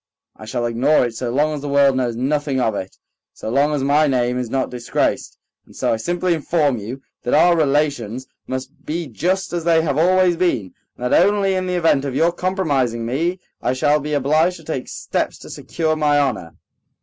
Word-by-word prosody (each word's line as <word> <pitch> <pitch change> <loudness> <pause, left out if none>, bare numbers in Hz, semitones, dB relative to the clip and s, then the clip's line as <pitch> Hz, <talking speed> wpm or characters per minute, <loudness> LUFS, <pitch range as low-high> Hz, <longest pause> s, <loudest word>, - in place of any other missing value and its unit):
"I 110 - -11
shall 120 +2 -2
ignore 125 +5 +2
it 120 - -4
so 120 +2 -4
long 150 +5 +1
as 150 - -5
the 145 - -5
world 140 -1 +4
knows 125 -3 -1
nothing 140 +2 -1
of 115 -3 +1
it, 95 -1 -6 0.4
so 110 - -6
long 145 +4 +2
as 140 - -2
my 145 +2 +3
name 125 -2 0
is 125 -2 -4
not 130 +1 -1
disgraced. 120 -1 -2 0.3
And - - -18
so - - 0
I - - 0
simply 175 +8 0
inform 150 -5 0
you 125 +7 -7 0.2
that 125 - 0
our 175 +3 +5
relations 140 -6 0 0.2
must 130 +4 -6
be 165 +2 -3
just 175 - -2
as 170 -1 -2
they 165 -1 +3
have 150 -2 0
always 180 0 +3
been, 120 - 0 0.2
and 125 0 -2
that - - +6
only 200 -1 +1
in 185 0 -1
the 180 - -1
event 165 -5 +2
of 135 -2 -4
your 165 +4 +3
compromising 145 - -1
me 165 +10 -1 0.2
I 125 - 0
shall 145 +3 +2
be 150 +1 -4
obliged 155 +6 +2
to 165 - -15
take 145 -5 -4
steps - - -3
to - - -12
secure 160 -2 -2
my 150 -1 +2
honor." 125 - -1
145 Hz, 210 wpm, -20 LUFS, 125-165 Hz, 0.4 s, that